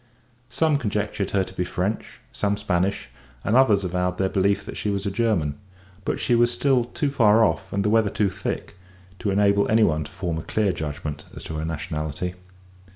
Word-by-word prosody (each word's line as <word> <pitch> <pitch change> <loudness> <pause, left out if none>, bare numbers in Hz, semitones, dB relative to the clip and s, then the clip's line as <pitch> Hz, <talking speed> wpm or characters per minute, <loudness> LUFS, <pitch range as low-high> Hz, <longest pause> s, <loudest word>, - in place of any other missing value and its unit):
Some 145 +4 +2
conjectured 105 -5 -2
her 100 -1 +2
to - - -10
be 90 - -1
French, 95 +4 -3
some 105 0 0
Spanish, 100 -1 -1 0.3
and 110 - +1
others 110 -7 +5
avowed 90 0 -1
their 95 -1 +1
belief 100 +1 +1
that - - -7
she 105 - -2
was 100 0 -2
a 100 - 0
German; 95 -10 0 0.5
but - - -1
she - - +1
was 120 0 +4
still 125 0 +2
too 140 +4 -2
far 110 -4 +5
off, 95 -2 -2
and 100 0 -1
the - - +3
weather 110 -2 +4
too 100 -1 0
thick, 95 - -4 0.4
to 105 - -1
enable 100 0 +3
any 110 0 +5
one 75 -5 +2
to - - -11
form 85 -3 -3
a - - -4
clear 100 +2 0
judgment 75 -2 -5
as - - -8
to - - -6
her 80 - -2
nationality. 80 0 -3
100 Hz, 200 wpm, -24 LUFS, 90-110 Hz, 0.5 s, others